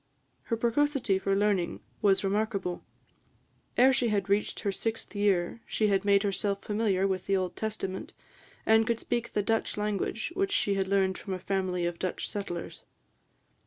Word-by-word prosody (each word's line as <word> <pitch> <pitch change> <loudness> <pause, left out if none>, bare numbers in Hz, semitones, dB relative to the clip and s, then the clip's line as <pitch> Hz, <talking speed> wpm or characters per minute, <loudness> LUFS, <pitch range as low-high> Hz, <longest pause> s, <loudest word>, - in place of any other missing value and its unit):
Her 230 - -1
precocity 240 -3 +2
for 195 0 +1
learning 195 - +1 0.2
was 195 -1 +4
remarkable. 200 -2 -1 0.9
Ere 260 +2 +6
she 245 -1 +2
had 200 -3 0
reached 200 +1 +1
her 200 - 0
sixth 225 +1 -4
year, 205 +1 +1
she 215 -1 +1
had 195 -1 +2
made 200 0 +4
herself 200 0 -1
familiar 205 -3 +1
with 190 -1 -2
the 195 - +3
Old 185 -1 -2
Testament, 210 -3 -4 0.5
and 220 0 +5
could 235 -1 +1
speak 235 -1 -2
the 205 - +1
Dutch 225 +1 0
language, 210 - -2
which 390 +1 0
she 210 - +2
had 195 -1 0
learned 190 -1 +2
from 195 - -5
a - - -6
family 185 -2 -1
of 175 0 -3
Dutch 185 - -2
settlers. 175 -5 -5
200 Hz, 165 wpm, -29 LUFS, 190-220 Hz, 0.9 s, Ere